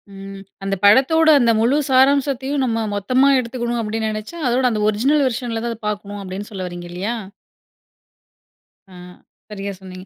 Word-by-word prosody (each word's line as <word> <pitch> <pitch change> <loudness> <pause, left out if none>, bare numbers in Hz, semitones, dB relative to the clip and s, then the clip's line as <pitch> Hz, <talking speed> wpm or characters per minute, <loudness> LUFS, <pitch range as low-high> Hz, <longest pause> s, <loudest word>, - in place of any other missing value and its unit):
ம். 195 0 -9 0.2
"அந்த 195 0 -1
படத்தோட 275 +10 +5
அந்த 235 -3 +3
முழு 250 +5 +2
சாராம்சத்தையும் 270 +1 +2
நம்ம 225 -2 -1
மொத்தமா 255 +7 +2
எடுத்துக்கணும் 240 -1 -3
அப்படி 220 +1 -3
நெனச்சா, 215 +9 -5
அதோட 250 +2 +1
அந்த 215 -2 -2
ஒரிஜினல் 275 +8 +2
வெர்ஷன் 240 -1 -3
ல 225 - -2
தான் 235 - -2
அத 225 - -13
பார்க்கணும்." 205 -1 -6
அப்படின்னு 195 +3 -7
சொல்ல 190 -3 -5
வர்றீங்க 175 0 -8
இல்லையா? 200 +7 -3 1.8
ஆ. - - -13 0.5
சரியா 200 -1 -5
சொன்னீங்க. 185 0 -10
225 Hz, 155 wpm, -20 LUFS, 200-260 Hz, 1.8 s, படத்தோட